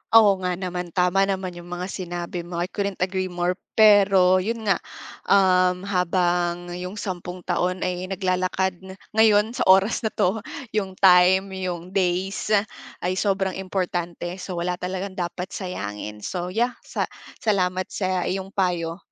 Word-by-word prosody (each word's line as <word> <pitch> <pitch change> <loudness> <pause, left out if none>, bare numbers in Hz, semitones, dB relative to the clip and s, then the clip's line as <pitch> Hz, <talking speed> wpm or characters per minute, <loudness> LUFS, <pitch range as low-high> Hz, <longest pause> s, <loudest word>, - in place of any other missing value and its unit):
Oo 205 -4 +7
nga 180 -1 -1
naman. 180 -1 -4
Tama 185 +2 +3
naman 190 -2 -2
yung 175 0 -11
mga 175 +1 -4
sinabi 175 -1 -5
mo. 170 0 -7
I 180 - -6
couldn't 200 -3 -2
agree 185 0 -1
more 180 +1 -2 0.2
pero 195 -4 +6
yun 225 +3 -3
nga, 195 -4 +2 0.5
um, 185 -2 +4
habang 175 -2 0
yung 180 +2 -6
sampung 180 -2 -5
taon 180 +1 0
ay 180 0 -3
naglalakad 185 -1 0 0.3
ngayon 220 0 +4
sa - - -4
oras 195 +3 +5
na - - -1
'to, 205 0 0 0.3
yung 195 -3 -1
time, 190 +1 +5
yung 180 -1 -4
days, 190 +1 0 0.6
ay 180 - +1
sobrang 195 -2 0
importante. 175 -2 -3
So, 180 -1 -5
wala 180 +1 -2
talagang 190 +2 -3
dapat 180 +1 -4
sayangin. 105 - -5
So 180 -1 -3
yeah, 235 +6 +1
sa - - -3 0.4
salamat 185 -4 +1
sa 185 -2 -1
iyong 190 +1 -3
payo. 175 -3 0
185 Hz, 145 wpm, -24 LUFS, 180-195 Hz, 0.6 s, Oo